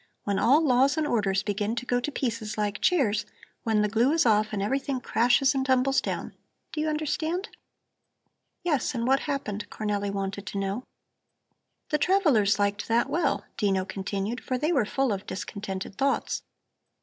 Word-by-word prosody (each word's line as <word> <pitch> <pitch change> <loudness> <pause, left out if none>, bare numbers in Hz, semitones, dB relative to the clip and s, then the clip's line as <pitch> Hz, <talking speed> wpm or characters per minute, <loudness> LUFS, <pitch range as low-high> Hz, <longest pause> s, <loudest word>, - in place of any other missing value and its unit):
"When 200 -1 0
all 280 +6 +5
laws 265 +2 +4
and 310 - +1
orders 205 -8 +1
begin 210 +2 -1
to 245 - -4
go 245 -1 +1
to 275 +5 -3
pieces 230 -6 -3
like 210 -1 -1
chairs, 240 - +2 0.4
when 220 -2 +2
the - - +2
glue 230 +6 +2
is 325 - +3
off 215 -1 +3
and 210 - -2
everything 265 +5 -1
crashes 245 +3 +3
and 270 -1 0
tumbles 265 +1 +3
down; - - -4 0.4
do 305 - -2
you 310 - 0
understand?" 315 +6 -2 1.1
"Yes. 295 -6 0
And 235 -1 -1
what 270 +2 +4
happened?" 260 -9 -3
Cornelli 205 -2 -2
wanted 195 0 -4
to 200 - -4
know. 195 +5 -2 1.0
"The 300 - +1
travellers 290 - +3
liked 205 0 0
that 230 +1 +2
well," 345 - 0
Dino 195 -3 +1
continued, 200 +4 -3
"for 255 - -1
they 300 +6 0
were 265 -10 +2
full 265 +1 0
of 195 0 -6
discontented 195 0 -5
thoughts. 275 0 0
230 Hz, 170 wpm, -27 LUFS, 205-275 Hz, 1.1 s, all